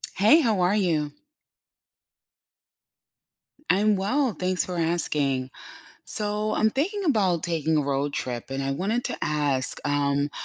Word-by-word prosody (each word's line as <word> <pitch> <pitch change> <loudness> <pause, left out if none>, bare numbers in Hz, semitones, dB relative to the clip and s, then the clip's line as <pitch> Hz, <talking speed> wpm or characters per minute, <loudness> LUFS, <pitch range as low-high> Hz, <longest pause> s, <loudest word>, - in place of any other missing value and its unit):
Hey, 220 - +5
how 225 -8 +1
are 180 +3 +2
you? 160 -7 0 2.6
I'm 205 +3 +2
well, 235 +6 0
thanks 185 0 0
for 180 -1 -5
asking. 145 -6 0 0.5
So 210 0 -1
I'm 220 - +2
thinking 385 - -2
about 195 - +1
taking 160 -2 0
a 150 - +3
road 140 0 -1
trip 125 -5 -4
and 135 +1 -3
I 135 - -2
wanted 200 - -1
to - - -4
ask, 145 -3 +2
um, 145 0 0
175 Hz, 130 wpm, -25 LUFS, 145-210 Hz, 2.6 s, Hey